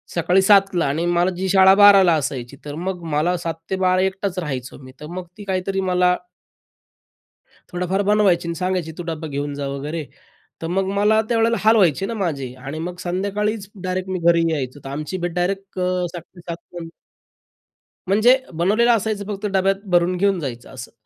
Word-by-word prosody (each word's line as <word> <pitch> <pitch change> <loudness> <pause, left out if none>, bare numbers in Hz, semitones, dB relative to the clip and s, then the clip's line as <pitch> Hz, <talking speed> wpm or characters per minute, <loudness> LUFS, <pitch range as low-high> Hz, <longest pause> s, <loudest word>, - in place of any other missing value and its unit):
सकाळी 175 +3 +3
7:00 195 -1 +4
ला 170 - +2
आणि 155 +5 -1
मला 175 +1 +2
जी 190 +1 -2
शाळा 190 0 +6
12:00 205 -1 +8
ला 175 -2 +4
असायची, 130 -1 -5
तर 145 - -6
मग 180 +1 -4
मला 165 +5 +1
7:00-12:00 185 +3 -1
एकटाच 190 -1 -2
राहायचो 135 -6 -5
मी. 130 - -12
तर 150 - -9
मग 185 - -5
ती 205 - -9
काहीतरी 195 0 -2
मला 180 -1 +2 1.6
थोडाफार 180 +3 -1
बनवायची 195 -5 +3
आणि 170 - -2
सांगायची 180 -2 -2
तू - - -3
डब्बा 160 -1 -5
घेऊन 145 0 -4
जा 140 0 -4
वगैरे. 145 +3 -4 0.6
तर - - -2
मग 190 +2 0
मला 210 +2 +3
त्यावेळेला 230 0 +2
हाल 220 +1 +4
व्हायचे 190 -1 +3
ना 230 - -4
माझे 145 - -3
आणि 140 +3 -5
मग 175 +2 -5
संध्याकाळीच 200 +3 -2
डायरेक्ट 185 0 -3
मी 185 - -1
घरी 170 0 +3
यायचो. 140 -1 -4
तर - - -6
आमची 150 +6 -4
भेट 175 0 -3
डायरेक्ट 195 +2 -2
अ, 180 -1 0
7:00 175 - -6
टू 175 - -13
7:00 170 -1 -4 0.2
नंतर 165 - -7 1.2
म्हणजे 220 +6 +5 0.2
बनवलेलं 210 +9 +2
असायचं 210 -1 -3
फक्त 205 +1 -4
डब्यात 195 0 +2
भरून 175 +1 +3
घेऊन 195 +1 +1
जायचं 125 -4 -6
असं. 125 -2 -9
180 Hz, 180 wpm, -21 LUFS, 165-195 Hz, 1.6 s, 12:00